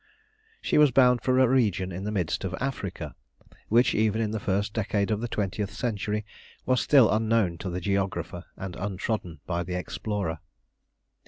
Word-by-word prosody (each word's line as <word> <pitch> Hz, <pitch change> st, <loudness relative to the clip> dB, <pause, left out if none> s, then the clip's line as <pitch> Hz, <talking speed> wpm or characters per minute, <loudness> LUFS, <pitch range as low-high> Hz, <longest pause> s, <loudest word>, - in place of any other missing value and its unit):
She -, -, +2 dB
was 150 Hz, -1 st, +7 dB
bound 125 Hz, -2 st, +4 dB
for 130 Hz, +2 st, +2 dB
a 130 Hz, 0 st, +6 dB
region 105 Hz, -8 st, +1 dB
in 95 Hz, +3 st, -5 dB
the 105 Hz, -, -2 dB
midst 90 Hz, -6 st, -1 dB
of 90 Hz, -2 st, -2 dB
Africa, 95 Hz, -, -4 dB, 0.5 s
which, 120 Hz, +2 st, +4 dB
even 110 Hz, 0 st, +2 dB
in 110 Hz, -2 st, 0 dB
the 110 Hz, -, -2 dB
first 100 Hz, +1 st, -1 dB
decade 105 Hz, -1 st, 0 dB
of 105 Hz, 0 st, 0 dB
the 120 Hz, -, -2 dB
twentieth 100 Hz, -2 st, -2 dB
century, 105 Hz, -3 st, -2 dB, 0.4 s
was 130 Hz, -1 st, +2 dB
still 135 Hz, -7 st, +5 dB
unknown 110 Hz, -5 st, +1 dB
to 95 Hz, -, -4 dB
the 90 Hz, +1 st, -3 dB
geographer 95 Hz, -2 st, -2 dB
and 95 Hz, -2 st, -6 dB
untrodden 95 Hz, -4 st, -3 dB
by 85 Hz, -1 st, -1 dB
the 90 Hz, +1 st, -4 dB
explorer. 95 Hz, -1 st, -3 dB
105 Hz, 170 wpm, -27 LUFS, 95-115 Hz, 0.5 s, was